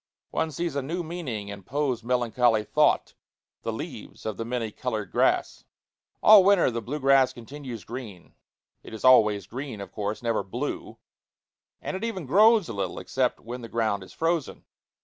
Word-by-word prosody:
One 160 Hz, -, 0 dB
sees 165 Hz, 0 st, -3 dB
a 140 Hz, -, 0 dB
new 170 Hz, +7 st, -3 dB
meaning 140 Hz, -, -5 dB
in 100 Hz, -1 st, -7 dB
Poe's 130 Hz, +2 st, -2 dB
melancholy 120 Hz, -2 st, +2 dB
thought -, -, +2 dB, 0.5 s
the -, -, -3 dB
leaves -, -, -8 dB
of 110 Hz, -2 st, -2 dB
the 115 Hz, -, -4 dB
many 115 Hz, -2 st, -3 dB
colored 110 Hz, -5 st, -4 dB
grass. -, -, +1 dB, 0.6 s
All 210 Hz, -3 st, +9 dB
winter 195 Hz, -8 st, +4 dB
the 115 Hz, 0 st, -3 dB
blue 140 Hz, +7 st, -4 dB
grass 135 Hz, -1 st, +4 dB
continues 125 Hz, -2 st, -8 dB
green 110 Hz, -7 st, -9 dB, 0.5 s
it -, -, -10 dB
is 110 Hz, -, -5 dB
always 105 Hz, -6 st, +5 dB
green, 125 Hz, +1 st, -6 dB
of 100 Hz, -, -8 dB
course, 105 Hz, +2 st, -4 dB
never 115 Hz, -3 st, +1 dB
blue 95 Hz, -1 st, -5 dB, 0.9 s
and -, -, -3 dB
it 190 Hz, -, -5 dB
even 220 Hz, -8 st, -3 dB
grows 210 Hz, -, +5 dB
a -, -, -5 dB
little, 95 Hz, -4 st, -3 dB
except -, -, -1 dB
when 125 Hz, +2 st, -7 dB
the 115 Hz, -, -8 dB
ground 110 Hz, -3 st, 0 dB
is 95 Hz, -, -12 dB
frozen. 165 Hz, -2 st, -2 dB
125 Hz, 170 wpm, -26 LUFS, 110-150 Hz, 0.9 s, All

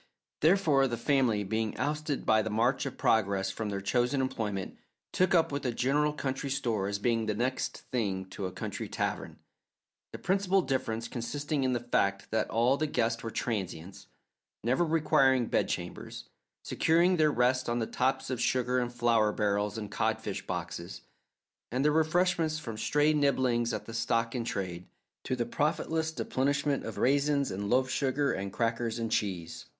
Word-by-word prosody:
Therefore 155 Hz, -5 st, +4 dB
the 120 Hz, -2 st, -3 dB
family, 120 Hz, -4 st, +2 dB
being 110 Hz, +2 st, -2 dB
ousted 150 Hz, +2 st, -2 dB
by 110 Hz, 0 st, +4 dB
the 110 Hz, -, -3 dB
march 120 Hz, +6 st, +1 dB
of 135 Hz, -, -7 dB
progress 100 Hz, -3 st, +2 dB
from 110 Hz, +1 st, -4 dB
their 100 Hz, -1 st, -3 dB
chosen 125 Hz, +6 st, +1 dB
employment, 105 Hz, -7 st, -3 dB, 0.3 s
took 185 Hz, 0 st, +2 dB
up 165 Hz, -3 st, +3 dB
with 140 Hz, 0 st, -3 dB
a 125 Hz, -, 0 dB
general 145 Hz, +5 st, +1 dB
country 140 Hz, -1 st, -3 dB
store 120 Hz, -8 st, -1 dB
as 100 Hz, 0 st, -1 dB
being 115 Hz, +1 st, 0 dB
the 105 Hz, -, 0 dB
next 125 Hz, +4 st, -2 dB
thing 100 Hz, -6 st, -1 dB
to 95 Hz, -, -4 dB
a -, -, -7 dB
country 95 Hz, -, -5 dB
tavern, -, -, -3 dB, 0.7 s
the -, -, -6 dB
principal 195 Hz, 0 st, +1 dB
difference 115 Hz, -5 st, -2 dB
consisting 145 Hz, +5 st, -3 dB
in 130 Hz, -1 st, +1 dB
the 120 Hz, -, 0 dB
fact 100 Hz, -4 st, 0 dB
that 110 Hz, 0 st, 0 dB
all 120 Hz, +4 st, +3 dB
the 155 Hz, -, 0 dB
guests 115 Hz, -4 st, 0 dB
were 115 Hz, -, -4 dB
transients, 95 Hz, -6 st, -4 dB, 0.6 s
never 130 Hz, +8 st, +2 dB
requiring 140 Hz, -6 st, +3 dB
bedchambers, -, -, -3 dB, 0.4 s
securing 175 Hz, +3 st, +3 dB
their 155 Hz, -1 st, +4 dB
rest 125 Hz, -1 st, +1 dB
on 120 Hz, -, 0 dB
the 115 Hz, -, 0 dB
tops 130 Hz, +3 st, -1 dB
of 125 Hz, -2 st, -2 dB
sugar 125 Hz, 0 st, +1 dB
and 120 Hz, -1 st, -2 dB
flour 115 Hz, -3 st, +3 dB
barrels 105 Hz, 0 st, 0 dB
and 105 Hz, -2 st, -6 dB
codfish 110 Hz, -2 st, -2 dB
boxes, -, -, -5 dB, 0.7 s
and 130 Hz, +4 st, 0 dB
their 150 Hz, -, +5 dB
refreshment 160 Hz, +1 st, +2 dB
from 150 Hz, -8 st, -5 dB
stray 150 Hz, +7 st, +2 dB
nibblings 130 Hz, -5 st, +2 dB
at -, -, -4 dB
the 115 Hz, -, -8 dB
stock 115 Hz, 0 st, 0 dB
in 125 Hz, -3 st, -2 dB
trade, 90 Hz, -5 st, -4 dB, 0.4 s
to 130 Hz, -, -1 dB
the 120 Hz, -1 st, -1 dB
profitless 160 Hz, +4 st, -1 dB
deplenishment 140 Hz, -1 st, 0 dB
of -, -, -6 dB
raisins 140 Hz, -1 st, +2 dB
and 100 Hz, +2 st, -3 dB
loaf 130 Hz, +2 st, +3 dB
sugar 135 Hz, +2 st, 0 dB
and 95 Hz, 0 st, -4 dB
crackers 115 Hz, +1 st, -1 dB
and 115 Hz, -1 st, -3 dB
cheese. 90 Hz, -7 st, -2 dB
125 Hz, 170 wpm, -30 LUFS, 110-140 Hz, 0.7 s, their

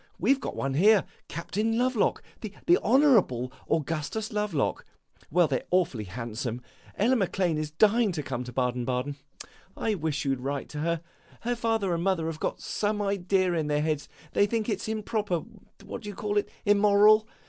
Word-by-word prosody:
We 270 Hz, -, +4 dB
've 275 Hz, -, -4 dB
got -, -, -4 dB
one 135 Hz, 0 st, -2 dB
here, 200 Hz, +7 st, +5 dB, 0.2 s
Captain 215 Hz, +6 st, -2 dB
Lovelock, 250 Hz, -3 st, +1 dB, 0.2 s
the 210 Hz, -2 st, -7 dB, 0.2 s
Honourable 215 Hz, -, +3 dB, 0.2 s
Augustus 165 Hz, +8 st, -2 dB
Lovelock. 210 Hz, -9 st, -1 dB, 0.5 s
Well, 175 Hz, +1 st, +4 dB
they 135 Hz, -3 st, +1 dB
're -, -, -18 dB
awfully 170 Hz, -, +1 dB
handsome. 115 Hz, +4 st, -5 dB, 0.4 s
Ella 235 Hz, +6 st, +3 dB
Maclane 185 Hz, -6 st, 0 dB
is 155 Hz, -1 st, -3 dB
dying 215 Hz, +6 st, +3 dB
to 155 Hz, -3 st, -3 dB
come 125 Hz, -2 st, -4 dB
to 125 Hz, -, -7 dB
Baden 125 Hz, 0 st, 0 dB
Baden. 130 Hz, +3 st, -2 dB, 0.6 s
I 220 Hz, -, 0 dB
wish 155 Hz, -6 st, -2 dB
you 135 Hz, -1 st, +2 dB
'd -, -, -11 dB
write 140 Hz, +1 st, -3 dB
to 150 Hz, -, -6 dB
her. 170 Hz, +1 st, 0 dB, 0.4 s
Her 240 Hz, +1 st, -1 dB
father 225 Hz, -5 st, 0 dB
and 170 Hz, 0 st, -1 dB
mother 185 Hz, -4 st, +1 dB
have 160 Hz, -1 st, -4 dB
got -, -, -2 dB
some 210 Hz, 0 st, -1 dB
idea 195 Hz, -2 st, +1 dB
in 160 Hz, -3 st, 0 dB
their 150 Hz, 0 st, +1 dB
heads; 155 Hz, -2 st, -2 dB, 0.2 s
they 205 Hz, -, +4 dB
think 225 Hz, +1 st, -1 dB
it 205 Hz, -3 st, -1 dB
's -, -, -6 dB
improper 210 Hz, -5 st, -1 dB, 0.4 s
what -, -, -6 dB
do 210 Hz, -, -7 dB
you 205 Hz, -, -7 dB
call 210 Hz, 0 st, -2 dB
it? -, -, -5 dB, 0.2 s
immoral. 210 Hz, +1 st, +5 dB
180 Hz, 185 wpm, -27 LUFS, 145-215 Hz, 0.6 s, here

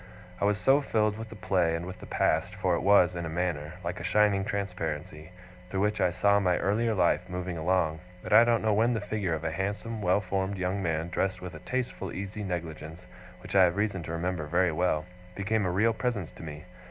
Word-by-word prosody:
I -, -, +1 dB
was 105 Hz, 0 st, +2 dB
so 135 Hz, +6 st, +4 dB
filled 105 Hz, -6 st, +1 dB
with 115 Hz, 0 st, -7 dB
the -, -, -10 dB
play, 90 Hz, -4 st, +1 dB
and 85 Hz, +1 st, -4 dB
with 90 Hz, 0 st, -8 dB
the -, -, -10 dB
past -, -, +1 dB
for -, -, +1 dB
it -, -, +1 dB
was, 95 Hz, -2 st, +5 dB
in 85 Hz, -1 st, -4 dB
a 80 Hz, -, -4 dB
manner, 80 Hz, -2 st, -2 dB
like 85 Hz, +1 st, -4 dB
a -, -, -6 dB
shining 100 Hz, +2 st, +3 dB
transparency, 80 Hz, -6 st, -4 dB, 0.4 s
through 95 Hz, +1 st, -1 dB
which 105 Hz, 0 st, +1 dB
I 90 Hz, -, +4 dB
saw 100 Hz, +3 st, +3 dB
my 90 Hz, -3 st, +2 dB
earlier 110 Hz, +3 st, +1 dB
life 90 Hz, 0 st, +2 dB
moving 90 Hz, 0 st, -4 dB
along 80 Hz, -1 st, +1 dB, 0.2 s
that -, -, -2 dB
I 115 Hz, -, +9 dB
don't 120 Hz, -1 st, +2 dB
know 110 Hz, -1 st, +3 dB
when 115 Hz, +3 st, +3 dB
the -, -, 0 dB
figure 105 Hz, -4 st, -2 dB
of 80 Hz, -, -6 dB
a 80 Hz, -, -1 dB
handsome 100 Hz, +5 st, -3 dB
well 90 Hz, +1 st, +3 dB
formed 95 Hz, 0 st, -2 dB
young 95 Hz, +2 st, -1 dB
man 80 Hz, -1 st, -1 dB
dressed 95 Hz, +2 st, -1 dB
with 90 Hz, -2 st, -7 dB
a 80 Hz, -, -8 dB
tasteful 125 Hz, +8 st, -3 dB
easy 100 Hz, +2 st, -5 dB
negligence 85 Hz, -3 st, -5 dB, 0.4 s
which -, -, -8 dB
I 95 Hz, -1 st, +8 dB
have 85 Hz, 0 st, 0 dB
reason 100 Hz, -3 st, 0 dB
to 80 Hz, -, -6 dB
remember 85 Hz, -1 st, -2 dB
very 90 Hz, +2 st, +2 dB
well, 80 Hz, -1 st, 0 dB, 0.3 s
became 100 Hz, 0 st, 0 dB
a -, -, 0 dB
real 110 Hz, +5 st, +3 dB
presence 110 Hz, -7 st, -2 dB
to -, -, -13 dB
me. 75 Hz, -1 st, -8 dB
95 Hz, 225 wpm, -28 LUFS, 85-105 Hz, 0.4 s, I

